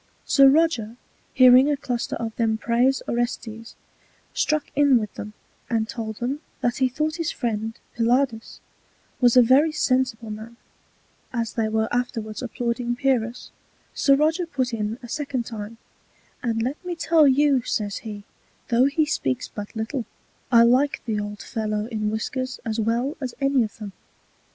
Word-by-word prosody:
Sir 275 -1 +6
Roger 270 -7 +2 0.4
hearing 255 +2 +7
a 290 - +1
Cluster 245 -3 -3
of 225 -1 -5
them 225 -2 +1
praise 245 +4 +1
Orestes, 230 -1 -3 0.6
struck 305 -1 0
in 285 -2 +5
with 215 -3 -3
them, 210 +1 -8 0.4
and 225 -2 0
told 220 -2 -5
them, 255 +6 -3 0.2
that 240 0 0
he 260 -1 +2
thought 305 +5 -2
his 330 -3 -1
Friend 225 -2 -3 0.2
Pylades 235 0 0 0.6
was 245 -1 +4
a 250 - +9
very 275 +7 +4
sensible 255 -6 0
Man; 220 +2 -9 0.7
as 230 -3 -2
they 220 -2 0
were 220 0 0
afterwards 230 -3 -2
applauding 240 -1 -2
Pyrrhus, 245 -2 -1 0.4
Sir 275 - +4
Roger 315 +4 +1
put 260 -6 -2
in 215 0 -2
a - - -7
second 270 -2 -3
time; 220 -1 -7 0.6
And 225 -2 -1
let 265 +8 -4
me 360 -1 -4
tell 325 -2 +4
you, 275 -1 +4
says 205 -3 -2
he, 210 -2 -8 0.5
though 240 +2 +4
he 305 +3 +2
speaks 135 - -2
but 205 +2 -8
little, 225 +3 -3 0.5
I 235 -1 +7
like 255 +5 +3
the 220 -3 -1
old 205 0 -6
Fellow 215 -1 -2
in 215 -2 -2
Whiskers 255 +4 -3
as 225 0 -2
well 235 +7 0
as 255 -3 -4
any 275 -1 +2
of 215 - -6
them. 210 -3 -7
240 Hz, 160 wpm, -24 LUFS, 220-270 Hz, 0.7 s, a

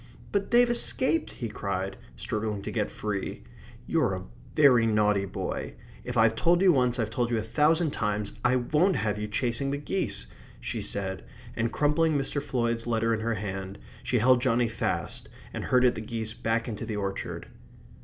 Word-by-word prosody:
"But 200 -1 0
they'd 240 +1 +5
escaped!" 260 +5 +1
he 120 - -4
cried, 95 -2 -3 0.2
struggling 105 - -3
to - - -4
get 105 -3 -1
free. 105 -2 -4 0.4
"You're - - +1
a - - -6 0.3
very 125 -6 +6
naughty 105 -2 +2
boy. 95 - -4 0.3
If 125 0 -4
I've 110 0 +5
told 170 +10 +3
you 185 -2 +6
once, 125 -2 +2
I've 110 -2 -1
told 120 0 0
you 120 - +1
a - - 0
thousand 155 +7 +2
times. 105 -3 -2
I 125 +1 +4
won't 155 +9 +2
have 105 -1 -1
you 105 - -3
chasing 120 +4 -1
the 140 - -1
geese!" 145 - -2 0.3
she - - -4
said, 95 -3 -2 0.3
and 115 +1 0
crumpling 150 +1 +2
Mr. 140 +1 -1
Floyd's 115 -3 -1
letter 115 0 +1
in 110 - 0
her 115 +1 -1
hand, 95 -1 -5 0.2
she 125 - 0
held 125 +2 +4
Johnny 120 -2 +2
fast 115 0 -3 0.2
and - - -4
herded 125 -1 +4
the 110 - -5
geese 110 0 -3
back 115 +1 -1
into 110 -4 -5
the 110 - -4
orchard. 100 -1 -4
115 Hz, 180 wpm, -28 LUFS, 105-135 Hz, 0.4 s, very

